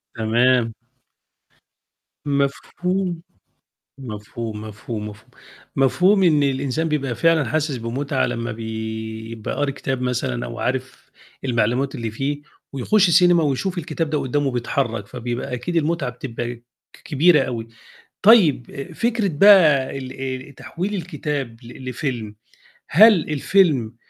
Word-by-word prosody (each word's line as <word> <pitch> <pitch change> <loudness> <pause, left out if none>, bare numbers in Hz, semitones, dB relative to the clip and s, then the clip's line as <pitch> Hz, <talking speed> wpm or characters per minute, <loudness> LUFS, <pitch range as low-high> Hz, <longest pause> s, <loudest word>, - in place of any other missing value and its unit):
تمام. 115 +1 +2 1.5
مفهوم. 170 +6 -1 0.8
مفهوم، 110 -2 -6
مفهوم، 105 0 -6
مفهوم، 105 +1 -13 0.5
مفهوم 180 +9 +4
إن 155 -5 +4
الإنسان 140 +3 0
بيبقى 140 -5 -1
فعلًا 165 -1 +3
حاسس 155 -3 -1
بمُتعة 130 +4 -1
لمّا 120 -1 -3
بيبقى 110 0 -5
قاري 145 -1 0
كتاب 135 -1 -3
مثلًا 125 0 -2
أو 115 - -7
عارف 130 +1 -4 0.3
المعلومات 125 +2 0
اللي 115 -2 -3
فيه 140 +5 -3 0.3
ويخُش 180 - +3
سينما 175 0 +5
ويشوف 165 +6 -1
الكتاب 165 -1 -3
ده 150 - +1
قُدّامه 140 +1 0
بيتحرّك، 120 -3 -2
فبيبقى 120 +2 -4
أكيد 170 +7 -4
المُتعة 155 -4 0
بتبقى 120 -1 -5
ك 120 - -24 0.4
كبيرة 150 +1 +4
أوي. 115 -3 -4 0.5
طيب 185 - +5
آآ 140 - -7
فكرة 230 -3 0
بقى 150 -6 +5
ال 130 -1 -7 0.4
ال 140 - -15
تحويل 170 +9 -5
الكتاب 150 -8 -4
ل 125 +2 -9
لفيلم، 120 -5 -4 0.6
هل 215 +7 +8 0.2
الفيلم 145 - +2
135 Hz, 120 wpm, -21 LUFS, 120-160 Hz, 1.5 s, هل